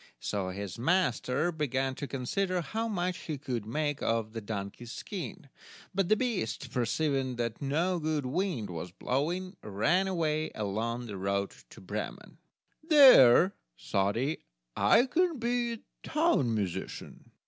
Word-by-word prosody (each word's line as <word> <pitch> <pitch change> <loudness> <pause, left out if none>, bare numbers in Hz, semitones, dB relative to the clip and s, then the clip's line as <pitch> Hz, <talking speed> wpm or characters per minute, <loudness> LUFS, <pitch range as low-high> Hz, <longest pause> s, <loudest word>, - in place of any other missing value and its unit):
So 95 +8 -2
his 100 +2 -6
master 170 0 +1
began 135 -4 -1
to 140 +2 -5
consider 180 +9 -1
how 225 +7 -2
much 180 -4 -2
he 155 -3 -5
could 125 -6 -4
make 145 +4 -1
of 115 -1 0
the 115 - -4
donkey's 105 +3 -6
skin, 185 - -6 0.5
but 190 -1 +1
the 215 - +6
beast, 185 - -2
perceiving 130 +1 0
that 115 -2 -3
no 165 +6 0
good 155 -3 -1
wind 145 - -1
was 85 +1 -5
blowing, 170 - -2
ran 140 - +1
away 155 -4 0
along 115 +4 -2
the 105 -4 -6
road 100 +1 -1 0.2
to - - -13
Bremen. - - -6 0.4
"There," 255 - +8 0.3
thought 100 +1 0
he, 135 +7 -1 0.4
"I 245 - +5
can 335 +4 +1
be 235 -1 -1 0.2
town 300 - +2
musician." 100 -5 -5
140 Hz, 135 wpm, -30 LUFS, 115-185 Hz, 0.5 s, There